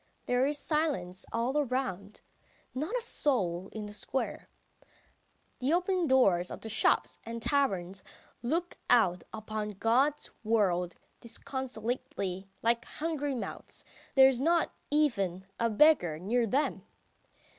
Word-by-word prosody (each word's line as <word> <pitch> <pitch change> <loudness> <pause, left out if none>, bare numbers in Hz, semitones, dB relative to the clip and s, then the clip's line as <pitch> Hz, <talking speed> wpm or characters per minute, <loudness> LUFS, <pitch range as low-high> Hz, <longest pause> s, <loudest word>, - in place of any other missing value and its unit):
There 250 +2 +2
is 290 0 0
silence 285 - -1
all 235 +4 -1
around. 240 -8 -2 0.5
Not 305 - -2
a 485 - -3
soul 190 - 0
in 215 -1 -6
the 210 - -8
square.... 265 +5 -3 1.1
The 265 +5 +1
open 360 -1 +1
doors 195 -10 +4
of - - -7
the 220 - -6
shops 220 - +2
and 230 0 -5
taverns 195 -9 0 0.4
look 335 +8 -2
out 185 -8 +4
upon 215 -1 -4
God's 265 +8 +2
world 185 -6 +1 0.2
disconsolately, 230 -6 -4
like 235 +1 +2
hungry 295 -3 -3
mouths; 240 - -6 0.3
there 265 -1 +9
is 260 -2 +1
not 335 +2 +2 0.2
even 200 - +1
a 230 - +2
beggar 215 - +4
near 230 +7 +1
them. 275 +7 0
235 Hz, 125 wpm, -30 LUFS, 195-285 Hz, 1.1 s, there